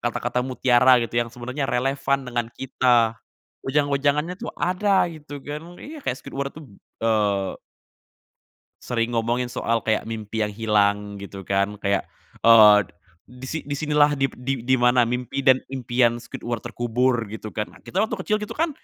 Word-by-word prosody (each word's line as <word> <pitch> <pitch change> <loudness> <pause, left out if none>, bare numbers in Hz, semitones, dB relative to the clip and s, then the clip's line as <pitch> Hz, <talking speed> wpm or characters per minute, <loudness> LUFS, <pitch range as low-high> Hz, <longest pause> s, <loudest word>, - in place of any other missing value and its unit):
kata-kata 120 +1 -1
mutiara 125 0 +4
gitu 115 - -9
yang 120 - -2
sebenarnya 125 +4 -5
relevan 135 +2 0
dengan 120 -2 -2
kita. 120 -3 +2 0.5
Wejang-wejangannya 145 +4 +1
tuh - - -7
ada 195 +2 +2
gitu 145 -3 -10
kan 155 +4 -7
iya, 305 +1 -8
kayak 125 - -1
Squidward 140 0 -4
tuh, 155 - -10 0.4
eee 105 -3 +1 1.2
sering 120 -1 -1
ngomongin 120 +2 0
soal, 115 -1 -1
kayak 110 -1 0
mimpi 110 -1 -3
yang 105 - -2
hilang 105 -1 +1
gitu 100 -1 -8
kan, 100 +1 0
kayak, 100 -1 0 0.4
eee, 110 -3 +8 0.5
di 125 +1 -11
si 160 - -2
"Di 145 - -4
sinilah," 150 0 +3
di 135 -1 0
di 130 0 -3
"di 130 +3 +2
mana 125 +1 +4
mimpi 125 +2 -3
dan 130 -1 +5 0.2
impian 120 -2 +1
Squidward 120 -1 -5
terkubur." 120 +1 0
Gitu 110 +1 -7
kan, 105 -1 -3
nah - - -16
kita - - -7
waktu 220 - -3
kecil 215 +3 0
gitu 210 -1 -6
kan, 330 +1 0
125 Hz, 160 wpm, -23 LUFS, 115-140 Hz, 1.2 s, eee